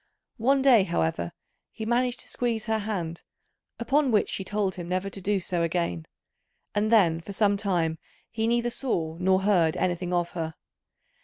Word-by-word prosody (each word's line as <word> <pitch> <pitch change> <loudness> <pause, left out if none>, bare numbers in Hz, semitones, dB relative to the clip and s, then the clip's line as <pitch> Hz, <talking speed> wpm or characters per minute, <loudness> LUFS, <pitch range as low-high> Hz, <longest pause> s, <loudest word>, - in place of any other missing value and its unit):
One 265 +4 +3
day, 250 -6 +7
however, 85 - -1 0.4
he 220 - -6
managed 245 +2 0
to - - -11
squeeze 230 -3 -2
her 220 -1 0
hand, 180 -6 -3 0.6
upon 275 +4 +2
which 215 -4 +2
she 190 - -3
told 200 -1 -1
him 175 -1 -7
never 185 +2 -1
to 195 - -6
do 200 +1 +1
so 175 -1 -2
again; 165 - -1 0.7
and 210 +2 +1
then 170 -7 +4
for 200 +4 -8
some 205 0 +3
time 175 -6 0 0.3
he 225 0 -1
neither 240 +1 +1
saw 165 -12 -2
nor 190 +1 +2
heard 180 -5 +3
anything 180 0 -1
of 175 -1 0
her. 160 -2 -4
195 Hz, 170 wpm, -27 LUFS, 170-225 Hz, 0.7 s, day